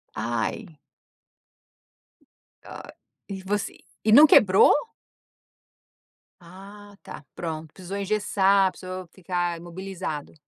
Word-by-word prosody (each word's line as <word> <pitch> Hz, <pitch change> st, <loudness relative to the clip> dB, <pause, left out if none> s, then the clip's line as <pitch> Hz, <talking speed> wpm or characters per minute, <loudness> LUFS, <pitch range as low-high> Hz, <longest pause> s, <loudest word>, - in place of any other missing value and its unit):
Ai. 120 Hz, -, -4 dB, 1.9 s
Ai -, -, -11 dB, 0.4 s
e 195 Hz, -1 st, -7 dB
você, 200 Hz, +1 st, -3 dB, 0.3 s
e 220 Hz, -, +2 dB
não 295 Hz, +7 st, +9 dB
quebrou? 195 Hz, -7 st, +6 dB, 1.7 s
Ah, 200 Hz, +4 st, -14 dB
está, 155 Hz, -, -11 dB
pronto 160 Hz, -2 st, -6 dB
precisou 190 Hz, +1 st, -7 dB
engessar, 200 Hz, -1 st, +2 dB
precisou 185 Hz, 0 st, -8 dB
ficar 175 Hz, -2 st, -3 dB
imobilizado. 175 Hz, -3 st, -7 dB
190 Hz, 85 wpm, -24 LUFS, 170-200 Hz, 1.9 s, não